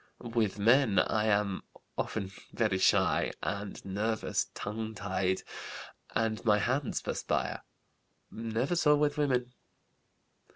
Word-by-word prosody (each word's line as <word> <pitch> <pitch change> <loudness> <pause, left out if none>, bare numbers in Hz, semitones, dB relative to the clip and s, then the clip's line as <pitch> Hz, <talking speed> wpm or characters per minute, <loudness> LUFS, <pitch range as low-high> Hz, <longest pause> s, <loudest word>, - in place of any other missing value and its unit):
With 110 -4 +1
men 115 +1 +4
I 110 0 +3
am 100 -3 +1 0.3
often 100 -3 -2 0.2
very 105 -5 +1
shy - - +3
and 100 0 -4
nervous, 105 +3 -1
tongue 110 +1 -4
tied, 95 -2 -1 0.7
and 110 -1 0
my 105 -3 +5
hands 130 +6 0
perspire. - - -1 0.7
Never 115 +7 -1
so 150 -3 +5
with 145 0 +1
women. 125 -4 +1
110 Hz, 110 wpm, -31 LUFS, 100-125 Hz, 0.7 s, my